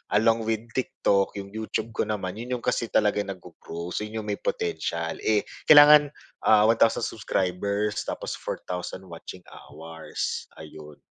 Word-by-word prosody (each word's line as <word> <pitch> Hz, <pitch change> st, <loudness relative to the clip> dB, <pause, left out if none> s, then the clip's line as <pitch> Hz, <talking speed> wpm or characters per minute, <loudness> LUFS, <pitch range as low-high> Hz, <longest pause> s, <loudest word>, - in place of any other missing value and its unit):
along 115 Hz, +1 st, +3 dB
with 110 Hz, 0 st, -1 dB
TikTok, 100 Hz, -6 st, 0 dB
yung 100 Hz, 0 st, -7 dB
YouTube 110 Hz, +1 st, -4 dB
ko -, -, 0 dB
naman 95 Hz, -3 st, -3 dB
'yon 125 Hz, +1 st, -3 dB
'yong -, -, -12 dB
kasi 120 Hz, -2 st, 0 dB
talaga 105 Hz, -1 st, +2 dB
nag-go-grow 90 Hz, -3 st, -8 dB
so -, -, -2 dB
'yon 105 Hz, +1 st, -5 dB
'yong 105 Hz, -, -7 dB
may -, -, -6 dB
potential, 85 Hz, 0 st, -2 dB
eh, 105 Hz, -1 st, +1 dB, 0.2 s
kailangan 150 Hz, -1 st, +9 dB, 0.3 s
ah 105 Hz, -1 st, +5 dB
1,000 115 Hz, 0 st, +3 dB
subscribers 100 Hz, +1 st, -1 dB
tapos -, -, -4 dB
4,000 90 Hz, +1 st, -6 dB
watching 90 Hz, +1 st, -10 dB
hours, 80 Hz, 0 st, -6 dB
ayun. 75 Hz, -1 st, -11 dB
105 Hz, 145 wpm, -26 LUFS, 90-110 Hz, 0.3 s, kailangan